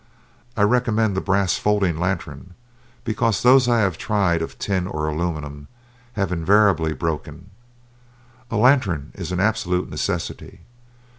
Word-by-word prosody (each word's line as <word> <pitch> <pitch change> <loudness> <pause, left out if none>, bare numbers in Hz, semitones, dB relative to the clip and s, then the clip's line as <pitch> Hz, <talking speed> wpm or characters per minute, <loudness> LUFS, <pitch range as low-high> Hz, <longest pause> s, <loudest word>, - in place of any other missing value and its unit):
I 105 - +3
recommend 110 -2 +2
the 95 - -1
brass 95 -2 +1
folding 100 -6 +1
lantern, 85 -4 -4 0.5
because 115 -1 0
those 125 0 +5
I 120 -1 +3
have 95 -6 0
tried 95 -6 +1
of 80 - -6
tin 95 -3 -1
or 75 -4 -3
aluminum 75 -3 -4 0.5
have 95 -5 -2
invariably 90 -1 +3
broken. 80 +2 -5 1.0
A 115 - -4
lantern 105 - +2
is 90 -2 -6
an 90 - -2
absolute 90 -3 0
necessity. - - -4
95 Hz, 130 wpm, -22 LUFS, 80-105 Hz, 1.0 s, those